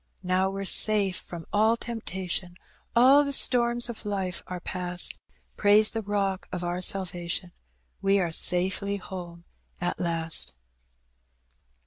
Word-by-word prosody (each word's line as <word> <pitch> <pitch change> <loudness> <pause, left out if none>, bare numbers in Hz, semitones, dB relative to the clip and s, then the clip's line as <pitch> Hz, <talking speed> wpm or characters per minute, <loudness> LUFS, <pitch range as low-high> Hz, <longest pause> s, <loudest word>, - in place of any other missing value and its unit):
"Now 185 +1 +1
we're 195 0 -5
safe 200 -1 +6
from 170 -2 -10
all 220 +2 +3
temptation, 190 -6 -5 0.4
All 265 +5 +6
the 280 - -3
storms 240 -3 +3
of 235 -2 -8
life 195 -4 -3
are 180 0 -6
past; 180 0 -1 0.4
Praise 210 +1 +5
the 225 - -3
Bock 195 -2 -2
of 180 -1 -5
our 175 +1 -3
salvation. 180 -1 -2 0.5
We 195 0 +2
are 175 -3 -1
safely 185 +4 +1
home 175 -3 -9 0.4
at 175 0 -3
last.' 165 -2 -2
190 Hz, 125 wpm, -26 LUFS, 180-210 Hz, 0.5 s, safe